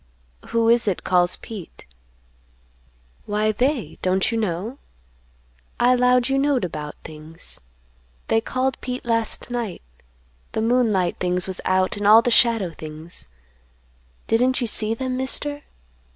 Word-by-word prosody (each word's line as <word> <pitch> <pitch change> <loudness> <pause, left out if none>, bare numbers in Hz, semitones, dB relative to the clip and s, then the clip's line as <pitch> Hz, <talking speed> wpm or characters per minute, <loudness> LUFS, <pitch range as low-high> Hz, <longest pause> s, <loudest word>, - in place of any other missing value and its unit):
"Who 230 0 +1
is 235 0 +4
it 195 - -1
calls 180 -1 +2
Pete?" 205 -7 -10 1.4
"Why, 210 +1 +1
they, 255 +3 -1
don't 185 +4 +1
you 230 - -1
know? 210 +6 -3 1.0
I 245 +1 +5
'lowed 250 0 +3
you 270 0 +1
knowed 275 -7 +2
about 150 -3 -6
things. 155 +1 -9 0.7
They 225 - +2
called 255 +2 -1
Pete 250 0 -5
last 230 +1 -1
night. 235 -6 -3 0.7
The 220 - 0
moonlight 225 -7 +2
things 180 0 0
was 190 -1 -5
out, 185 +2 +2
and 205 0 0
all 220 +2 +8
the 245 - +1
shadow 225 -6 +3
things; 155 - -11 1.0
didn't 250 +3 +2
you 245 - 0
see 220 0 -2
them, 255 +1 -3
Mister? 290 +3 -2
225 Hz, 135 wpm, -23 LUFS, 185-250 Hz, 1.4 s, all